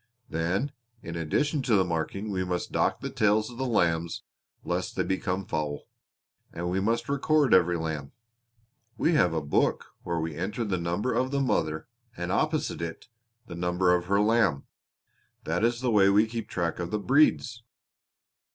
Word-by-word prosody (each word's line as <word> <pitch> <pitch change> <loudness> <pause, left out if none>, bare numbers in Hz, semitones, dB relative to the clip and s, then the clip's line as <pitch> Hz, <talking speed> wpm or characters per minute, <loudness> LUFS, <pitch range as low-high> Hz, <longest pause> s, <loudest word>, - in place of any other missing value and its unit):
Then 90 - -1 0.3
in 85 - -6
addition 140 - 0
to 120 -3 +2
the 95 -2 +4
marking 90 +5 -3
we 95 -1 -1
must 90 -1 -3
dock - - +1
the - - -3
tails 110 +2 +2
of 120 - -11
the 130 - -1
lambs 85 -7 0 0.4
lest - - -2
they - - +1
become 95 0 -2
foul; 75 -3 -3 0.7
and 85 +1 -3
we 95 - +1
must 115 +4 0
record 140 -2 +2
every 90 -2 +4
lamb. 80 -4 -4 0.9
We 170 - +2
have 90 - +4
a 80 -2 -2
book 70 - 0
where 85 -1 -2
we 80 0 -3
enter 105 +8 -3
the 95 -4 -1
number 85 +8 -1
of 130 +3 +1
the 140 0 0
mother 80 - 0 0.3
and 90 +1 -3
opposite 155 - 0
it 85 +8 -6 0.4
the 85 - -9
number 90 +1 +1
of 90 -1 +1
her 100 +2 +2
lamb. 105 -10 +2 0.8
That 85 +6 -1
is 120 +1 +1
the 125 -2 +1
way 100 -3 +5
we 105 +2 +5
keep 110 -1 -5
track 85 -2 -2
of 85 -1 -3
the 105 - -1
breeds." 125 -1 +2
95 Hz, 175 wpm, -27 LUFS, 85-115 Hz, 0.9 s, way